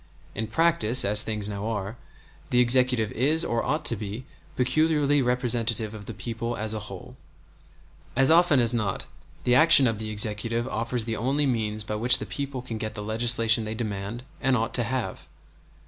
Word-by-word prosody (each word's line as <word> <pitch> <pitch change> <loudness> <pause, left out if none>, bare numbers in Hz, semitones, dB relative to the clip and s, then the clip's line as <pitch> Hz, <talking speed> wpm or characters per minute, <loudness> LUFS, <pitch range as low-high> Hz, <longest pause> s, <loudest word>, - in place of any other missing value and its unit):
In 110 +2 -4
practice, 130 -4 +3
as 105 +1 +4
things 105 -2 -2
now 100 0 -5
are, 105 -1 -4 0.5
the 125 - +2
Executive 125 -3 +4
is 155 +7 +1
or 115 0 -1
ought 155 +1 -2
to 115 - +4
be 105 +4 -7 0.3
peculiarly 145 +2 +1
representative 120 -3 -1
of 105 -2 -11
the 115 - -6
people 115 +3 -5
as 110 +1 -3
a 110 - -4
whole. 95 -2 -11 1.0
As 135 +3 +3
often 165 -4 +4
as 120 0 +3
not 105 -5 -2 0.4
the 125 - +1
action 155 0 +7
of 115 -3 -1
the 110 -1 -5
Executive 110 +3 0
offers 115 -1 -1
the 115 -1 -3
only 140 +5 0
means 110 -4 -2
by 105 - -6
which 125 +3 +4
the - - -6
people 140 -3 -5
can 115 -3 -6
get 110 0 -5
the 105 - -6
legislation 115 +1 +2
they 110 +1 -5
demand 110 +1 -5 0.2
and 135 -1 +1
ought 115 +1 -3
to 120 - +2
have. 125 0 -4
115 Hz, 180 wpm, -25 LUFS, 110-130 Hz, 1.0 s, action